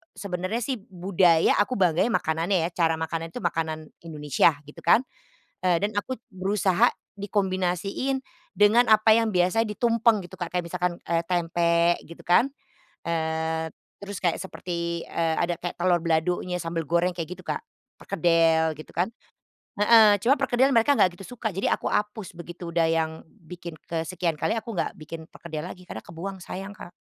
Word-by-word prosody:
sebenarnya 190 +4 -3
sih 260 0 -2
budaya 180 -4 +2
aku 205 +5 +1
bangganya 185 +3 +2
makanannya 165 +3 +1
ya, - - -7
cara 165 -2 +1
makanan 160 +1 -3
itu - - -5
makanan 160 -2 -2 0.2
Indonesia 150 0 +2
gitu 150 +1 -13
kan, 195 +9 +4 0.6
dan 185 +3 +1
aku 260 +4 -5 0.2
berusaha 190 -1 +2 0.2
dikombinasiin 195 +5 -1 0.3
dengan 220 +4 +5
apa 215 0 +6
yang 225 0 +4
biasanya 185 +6 +2
ditumpeng 230 -1 +2
gitu 175 - -12
Kak, 175 - -2
kayak 180 - 0
misalkan, 175 +1 -2
eee, 165 0 +1
tempe 170 -1 +2
gitu 170 - -12
kan, 180 +9 +4 0.6
eee, 160 0 -1 0.3
terus 200 0 -6
kayak 175 -2 +1
seperti, 170 -3 -4
eee, 165 -1 -1
ada 175 0 0
kayak 175 - -4
telor 175 0 +3
baladonya, 175 +2 0
sambel 165 -2 -3
goreng 170 +2 +2
kayak 165 -3 -5
gitu - - -14
Kak, - - -2 0.4
perkedel 165 -3 +3
gitu 155 - -10
kan. 180 +6 0 0.6
Heeh, 210 0 +7
cuma 250 +4 +5
perkedel 260 +3 +3
mereka 235 +4 +4
nggak 180 -1 +4
gitu 195 +6 -9
suka, 220 -2 -2
jadi 195 - -1
aku - - -5
hapus 210 -2 -2
begitu, 175 0 -7
udah 165 -1 +3
yang 160 -1 +1 0.2
bikin 170 -2 -10
kesekian 165 0 -2
kali, 160 +8 0
aku 225 +1 -5
nggak 175 - -2
bikin 160 +1 -9
perkedel 155 -2 -7
lagi 180 0 -10
karena - - -6
kebuang, 190 +4 -7
sayang, 195 +3 -6
Kak. 180 -4 -11
175 Hz, 160 wpm, -26 LUFS, 165-205 Hz, 0.6 s, Heeh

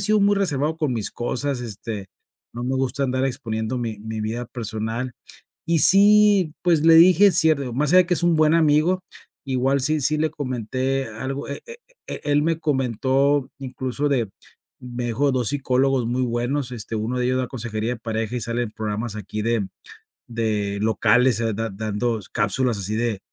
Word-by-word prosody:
sido 215 -1 +3
muy 200 0 +3
reservado 160 -5 0
con 155 -5 -1
mis 110 -4 -2
cosas, 125 +1 -3
este, 105 -3 -6 0.4
no 120 +1 -6
me 130 +1 -1
gusta 135 +1 -1
andar 130 0 0
exponiendo 120 -3 -3
mi 115 -3 -4
mi 110 0 -5
vida 115 +3 -3
personal 115 +1 -4 0.5
y 165 -1 +2
sí, 200 -2 +5
pues 170 -4 +3
le 165 - +7
dije: 180 +4 +7
"Es 185 - +3
cierto", 140 -6 +2
más 145 +3 0
allá 185 -1 +7
que 180 - +2
es 175 - 0
un 170 -2 +3
buen 155 0 +4
amigo 165 +3 +3 0.4
igual 135 +1 +1
sí 155 +3 +1
sí, 155 +3 +1
le 155 +1 +1
comenté 130 -1 -2
algo, 130 +6 -5
e 140 - -5 0.5
e - - -5
él 145 0 +2
me 165 +1 0
comentó 135 0 +1
incluso 130 +2 -3
de 125 -7 0 0.5
me 125 -1 -5
dijo 120 +5 0
de - - +2
2 125 -4 0
psicólogos 135 -2 +1
muy 125 +2 -1
buenos, 125 +2 -1
este, 115 -1 -5
1 110 +4 -2
de 125 - 0
ellos 130 +1 +1
da 130 -1 -1
consejería 115 -2 -3
de 115 - -15
pareja 115 +1 -3
y - - -4
sale 115 +2 -2
en 110 - -6
programas 110 +1 -4
aquí 105 +1 -5
de 115 -2 0 0.6
de 105 -3 -1
locales, 110 +3 +3
eh, 115 -1 0
da 115 +1 -2
dando 110 +3 -2
cápsulas 115 +2 0
así 100 +2 -3
de 115 -3 -1
125 Hz, 185 wpm, -22 LUFS, 115-145 Hz, 0.6 s, le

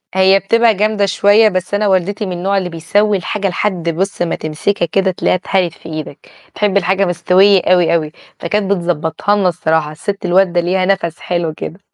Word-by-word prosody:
هي 190 +1 +4
بتبقى 230 +4 +2
جامدة 210 0 0
شوية، 205 +3 +4
بس 185 +1 -4
أنا 205 0 +1
والدتي 195 +2 0
من 185 - -5
النوع 195 +3 -1
اللي 185 -2 -2
بيسوّي 200 +5 0
الحاجة 200 +2 -3
لحد 180 -3 -2
بُص 185 +3 -3
ما 175 - 0
تمسكها 160 +4 -2
كده 190 +3 0
تلاقيها 180 - 0
اتهَرِت 180 -2 -1
في 165 - -13
إيدك. 155 -2 -8 0.3
تحب 205 -2 +1
الحاجة 195 0 +1
مستوية 185 +2 +3
أوي، 180 -2 +2
أوي، 155 -2 -1 0.3
فكانت 200 +3 -1
بتضبّطها 175 +2 -1
لنا 195 -3 +1
الصراحة، 160 -2 -1
السِت 195 +6 -5
الوالدة 180 -1 +2
ليها 185 +2 0
نَفَس 180 -4 -1
حلو 170 -3 -2
كده. 165 +4 -8
185 Hz, 180 wpm, -15 LUFS, 170-200 Hz, 0.3 s, هي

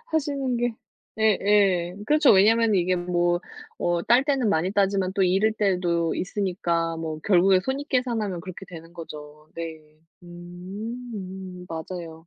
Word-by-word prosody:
하시는 275 -5 0
게 240 -1 -1 0.4
예 220 -3 +4
예. 190 -4 +3
그렇죠. 300 -2 +5
왜냐하면 220 +2 +4
이게 180 0 +2
뭐 175 0 +1 0.4
뭐 175 0 0
딸 245 +7 +4
때는 270 -6 +1
많이 175 0 +1
따지만 195 -2 +1
또 195 - +2
잃을 195 +4 +3
때도 180 -5 0
있으니까 175 -4 -1
뭐 160 -1 -4
결국에 185 -1 +4
손익 275 +6 -4
계산하면 225 -8 -1
그렇게 185 +2 -9
되는 165 -1 -11
거죠. 150 -2 -10
네. 155 -2 -8 0.2
음 185 +1 -8
맞아요. 165 0 -7
185 Hz, 275 characters per minute, -25 LUFS, 170-215 Hz, 0.4 s, 그렇죠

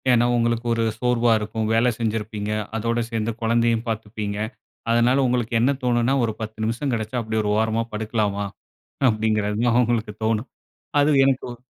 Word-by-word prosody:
ஏன்னா, 120 -1 +5
உங்களுக்கு 120 0 0
ஒரு 115 0 0 0.2
சோர்வா 120 -1 +2
இருக்கும். 110 +1 -3
வேலை 115 +2 +4
செஞ்சிருப்பீங்க. 105 -2 -2 0.2
அதோட 115 +2 0
சேந்து 115 0 -1
குழந்தையையும் 115 0 +2
பாத்துப்பீங்க. 105 -2 -4 0.5
அதனால 120 +4 +3
உங்களுக்கு 120 -2 -1
என்ன 130 +4 +4
தோணுன்னா, 120 +1 +2
ஒரு 110 - -2
10 110 0 -6
நிமிஷம் 120 +5 -1
கெடைச்சா 110 +2 -2
அப்டி 110 0 -2
ஒரு 105 - 0
ஓரமா 110 +1 +1
படுக்கலாமா, 105 -2 -1 0.7
அப்டிங்கறது 110 -1 0
தான் 120 0 +4
உங்களுக்கு 115 -3 -1
தோணும். 110 +2 0 0.5
அது 145 +1 +4
எனக்கும் 130 -3 -1
115 Hz, 150 wpm, -23 LUFS, 110-120 Hz, 0.7 s, ஏன்னா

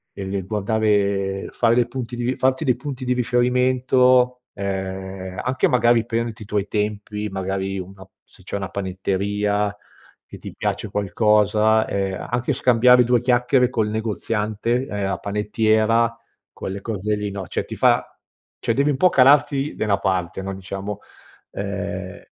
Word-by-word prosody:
e 95 0 -5
e - - -2
guardare 100 -1 0
fare 115 -1 +2
dei 120 -1 +3
punti 125 -1 -5
di 120 +2 -1
farti 130 +3 +1
dei 125 -3 +3
punti 135 0 -6
di 125 - -1
riferimento, 125 +1 +2
ehm, 95 -1 -5
anche 130 +1 +1
magari 120 -2 +3
prenderti 115 -1 -3
i - - -11
tuoi 105 -1 -1
tempi 105 0 -3
magari 95 0 -3
una 95 +1 -10 0.2
se - - -21
c'è 95 - -6
una 95 -2 -3
panetteria 100 +2 -1 0.5
che - - -11
ti - - -9
piace 110 - -2
qualcosa, 105 +2 +2
ehm, 95 -1 -3
anche 125 +4 0
scambiare 125 -1 +5
due 120 0 +3
chiacchiere 125 +1 +3
col 110 -5 0
negoziante, 110 +2 -1
ehm, 100 -1 -2
a 95 - -2
panettiera 110 +2 +1 0.4
quelle 95 +1 -5
cose 105 -1 -2
lì, 105 -1 -4
no, 100 -2 -6
cioè - - -3
ti - - -7
fa - - +3 0.5
cioè 115 - 0
devi 140 +5 +2
un 135 - -2
po' 185 +6 +5
calarti 140 0 +4
nella 105 -2 +1
parte 95 -2 -1
no, 95 0 -4
diciamo 95 +2 -6 0.5
ehm, 100 -2 -5
105 Hz, 150 wpm, -22 LUFS, 100-125 Hz, 0.5 s, scambiare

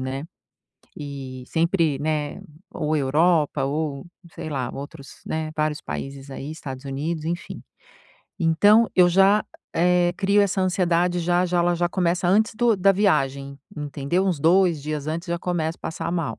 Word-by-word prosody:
né. 130 +2 -4 0.7
E 135 -3 -7
sempre, 165 -4 +1
né, 150 0 -2 0.3
ou 155 +1 -1
Europa 150 +1 +2
ou, 145 -1 -3 0.3
sei - - -6
lá, 130 -5 -2
outros, 140 0 -10
né 155 0 -3
vários 155 -1 -1
países 135 0 -6
aí, 140 +3 -6
Estados 135 -4 -8
Unidos, 150 +4 -3
enfim. 175 +1 -4 0.8
Então 205 +8 +5
eu 180 -1 +7
já, 195 +4 +4 0.3
eh, 175 +1 +3
crio 200 +1 +3
essa 195 -1 0
ansiedade. 180 -1 +1
Já, 175 +1 +2
já 180 0 0
ela 175 0 +2
já 175 0 +1
começa 175 -1 0
antes 215 +4 +3
do 235 -1 +3
da 195 +1 +4
viagem, 140 -9 0 0.2
entendeu? 150 +5 -1
Uns 175 -6 -1
2 170 -1 +3
dias 150 0 -4
antes, 170 +3 -4
já 170 0 -1
começo 165 -2 -2
a - - -46
passar 165 +1 -4
mal. 160 -10 -2
165 Hz, 160 wpm, -23 LUFS, 145-180 Hz, 0.8 s, eu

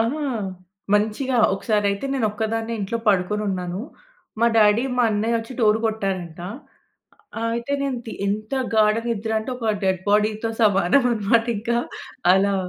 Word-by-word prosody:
ఆహా! 245 +7 0 0.7
మంచిగా 220 +5 +1 0.2
ఒకసారి 210 +1 0
అయితే, 200 +6 -4
నేను 240 -5 +1
ఒక్కదాన్నే 225 +1 -2
ఇంట్లో 215 +4 -2
పడుకొని 205 +2 +1
ఉన్నాను. 180 0 -3 0.6
మా 235 - +5
డాడీ, 215 +3 +5
మా 245 - +4
అన్నయ్యొచ్చి 225 +3 -1
డోర్ 215 0 +4
కొట్టారంట. 190 -6 -3 1.0
ఆహ్, 230 - 0
అయితే, 235 +4 -4
నేను 265 -3 -1
తి - - -6
ఎంత 215 +4 -3 0.2
గాఢ 215 0 +5
నిద్ర 220 -1 -2
అంటే, 220 - -5
ఒక 225 -3 0
డెడ్ 190 -2 +1
బాడీతో 215 +2 +1
సమానం 200 +5 +4
అన్నమాట 225 +1 +2
ఇంకా 235 +2 0 0.5
అలా 195 +1 +3
215 Hz, 140 wpm, -22 LUFS, 200-230 Hz, 1.0 s, మా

